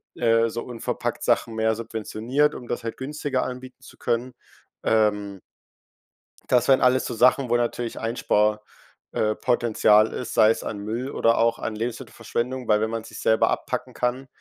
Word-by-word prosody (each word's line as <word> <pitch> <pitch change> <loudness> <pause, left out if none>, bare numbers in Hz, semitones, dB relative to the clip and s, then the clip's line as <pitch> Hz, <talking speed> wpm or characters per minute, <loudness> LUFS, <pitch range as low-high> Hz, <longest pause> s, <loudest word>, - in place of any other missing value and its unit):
äh, 115 -1 +3
so 120 +1 -4
unverpackt-Sachen 115 -1 -2
mehr 110 0 +2
subventioniert, 115 +6 -1
um 120 - -9
das 120 0 -4
halt 115 - -5
günstiger 140 -1 -2
anbieten 130 0 -8
zu - - -15
können.“ 120 +1 -2 0.5
Ähm 105 -3 +1 1.1
das 125 -1 +3
wären 135 -1 +5
alles 130 +1 +3
so - - -4
Sachen, 125 +2 +3
wo 120 - +3
natürlich 120 0 -2
Einspar 105 -2 +1 0.5
äh, 110 0 0
Potenzial 110 -3 +3
ist, 125 - -5
sei 110 - +6
es - - -3
an 105 - -5
Müll 115 +6 -4
oder 115 0 +2
auch 115 0 +2
an 110 - -4
Lebensmittelverschwendung, 120 +2 -4
weil 105 0 +3
wenn 110 - 0
man 115 0 -4
sich's - - -10
selber 110 - +3
abpacken - - -3
kann, 125 +2 -2
115 Hz, 160 wpm, -24 LUFS, 110-125 Hz, 1.1 s, sei